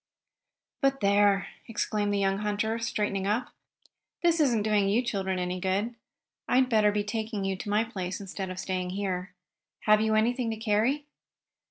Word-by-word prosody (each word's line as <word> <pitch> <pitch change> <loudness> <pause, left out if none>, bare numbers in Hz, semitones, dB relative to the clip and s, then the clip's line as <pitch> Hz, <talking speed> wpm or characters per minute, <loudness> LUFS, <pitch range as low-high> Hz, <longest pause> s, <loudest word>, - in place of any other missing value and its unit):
"But 275 -1 +2
there!" 200 0 +3 0.2
exclaimed 210 -2 -1
the 205 - +1
young 195 0 +1
hunter, 210 +2 -1
straightening 205 -3 -1
up. 215 +5 0 0.7
"This 340 -1 +3
isn't 240 -8 +3
doing 205 -2 +2
you 225 +5 +2
children 190 -5 -1
any 180 0 -2
good. 195 +6 0 0.5
I'd 255 0 +3
better 215 -3 +4
be 205 0 0
taking 215 -1 -3
you 195 0 0
to 205 - -6
my 210 +2 +3
place 190 -5 -4
instead 195 -1 -5
of 185 - -6
staying 185 -1 -2
here. 185 -2 -3 0.5
Have 215 0 +4
you 220 0 +2
anything 235 +2 +1
to 220 - -3
carry?" 225 +7 +1
210 Hz, 165 wpm, -28 LUFS, 195-225 Hz, 0.7 s, better